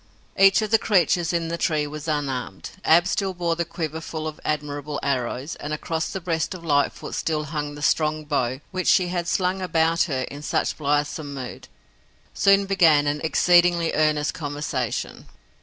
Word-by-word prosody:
Each 195 +3 +5
of 215 - -4
the 225 - +5
creatures 175 -4 +2
in 170 -1 -1
the 170 0 -3
tree 155 -3 +1
was 150 +1 -7
unarmed. 135 -9 -3
Ab 170 +2 +5
still 190 0 -1
bore 170 -1 0
the 170 - -1
quiver 160 -1 -4
full 160 -1 -5
of 155 - -7
admirable 145 -1 -3
arrows, 130 +2 -2
and 150 +1 -5
across 160 +1 -2
the 190 - -4
breast 165 +1 -2
of 170 -2 -10
Lightfoot 145 -2 0
still 155 -2 -1
hung 150 -1 -4
the 145 - -8
strong 155 -1 +1
bow 130 -3 -1
which 185 -1 -3
she 180 -2 +4
had 175 -1 -2
slung 185 +1 0
about 165 -2 +1
her 130 -3 -1
in 140 +3 -8
such - - -1
blithesome 145 0 -1
mood. 130 -2 -7 0.7
Soon 195 0 +4
began 165 -7 +4
an 145 0 -1
exceedingly 175 +1 +3
earnest 155 -1 +1
conversation. 145 -5 -4
155 Hz, 175 wpm, -24 LUFS, 145-175 Hz, 0.7 s, Each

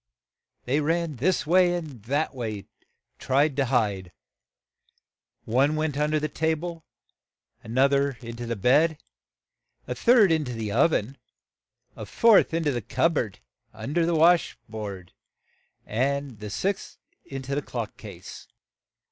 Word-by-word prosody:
They 140 +5 +1
ran 165 -1 -1
this 175 +9 +1
way 175 +2 +4
and 150 -9 -7
that 145 +6 -1
way 110 -5 -4
to - - -35 0.5
try 140 +4 +2
to 140 -1 -1
hide. 105 -8 0 1.3
One 135 +6 +2
went 155 -2 -1
un 150 +1 0
der 155 - +1
the 155 - -1
ta 160 +2 0
ble, 165 0 -7 0.8
an 115 +3 -6
oth 135 +1 +5
er 140 -2 +1
in 115 -1 -8
to 120 0 -6
the 115 - -2
bed, 145 - +3 0.9
a - - -3
third 230 -6 +5
in 160 -1 +2
to 125 - -5
the 110 -3 -4
ov 160 - +4
en, 130 +1 -2 0.8
a - - -8
fourth 230 -3 +5
in 165 0 -1
to 150 - +1
the 120 -2 -2
cup 165 - +1
board, 110 -10 -3 0.3
a 110 - -10
un 135 - -4
der 170 0 +2
the 170 - +1
wash 170 +2 +4
tub 100 -5 -7 0.8
the 130 -2 -2
sixth 195 - -3 0.3
in 135 -1 -7
to 135 +2 -4
the 145 - 0
clock 120 -6 -5
case. - - -11
140 Hz, 165 wpm, -26 LUFS, 120-160 Hz, 1.3 s, oth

